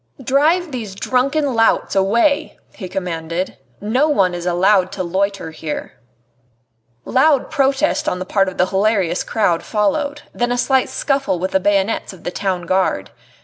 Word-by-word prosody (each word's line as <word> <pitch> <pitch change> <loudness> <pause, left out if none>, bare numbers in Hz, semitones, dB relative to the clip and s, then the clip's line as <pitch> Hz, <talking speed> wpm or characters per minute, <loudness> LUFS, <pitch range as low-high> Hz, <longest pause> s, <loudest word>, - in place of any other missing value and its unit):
"Drive 310 +7 +2
these 220 -7 -5
drunken 275 +6 0
louts 225 -3 +2
away!" 235 +10 +2 0.2
he 185 -4 -8
commanded; 170 -2 -4 0.2
"no 250 +9 +1
one 195 -11 +2
is 175 0 -4
allowed 185 +1 +3
to 195 -2 -3
loiter 190 -1 -2
here." 155 -1 -6 1.1
Loud 275 +2 +2
protest 290 +1 +1
on - - -3
the 185 - -5
part 195 0 +1
of 185 - -11
the 180 - +3
hilarious 195 -2 +1
crowd 180 -7 +1
followed, 285 +8 -1
then 240 0 -1
a 245 - 0
slight 265 +1 +2
scuffle 275 -8 0
with 185 +2 -3
the 190 - +3
bayonets 200 +2 0
of 185 - -15
the - - -3
Town 185 -2 -2
Guard. 185 +2 0
205 Hz, 155 wpm, -19 LUFS, 185-270 Hz, 1.1 s, allowed